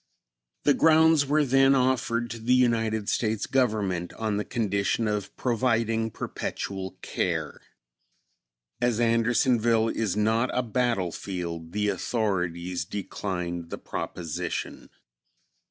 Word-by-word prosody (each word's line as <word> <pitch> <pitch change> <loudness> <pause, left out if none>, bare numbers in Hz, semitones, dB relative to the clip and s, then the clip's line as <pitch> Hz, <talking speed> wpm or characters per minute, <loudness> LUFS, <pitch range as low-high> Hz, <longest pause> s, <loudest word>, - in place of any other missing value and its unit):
The 145 - +5
grounds 160 -2 +5
were 150 +1 +3
then 135 +1 +5
offered 120 -2 +1
to 115 - -6
the 120 +3 +2
United 115 -4 +1
States 110 -2 0
Government 105 -9 0
on 110 -2 -2
the 105 - -1
condition 105 -1 0
of 105 -2 -3
providing 115 -2 +1
perpetual 95 -2 -5
care. - - -2 1.2
As 120 -2 +1
Andersonville 115 -1 +3
is 105 -4 -1
not 110 +4 +2
a 125 - +1
battlefield, 90 -8 -2
the 105 0 +1
authorities 90 -4 -1
declined 90 -2 -4
the - - -5
proposition. 85 0 -5
110 Hz, 105 wpm, -26 LUFS, 95-120 Hz, 1.2 s, The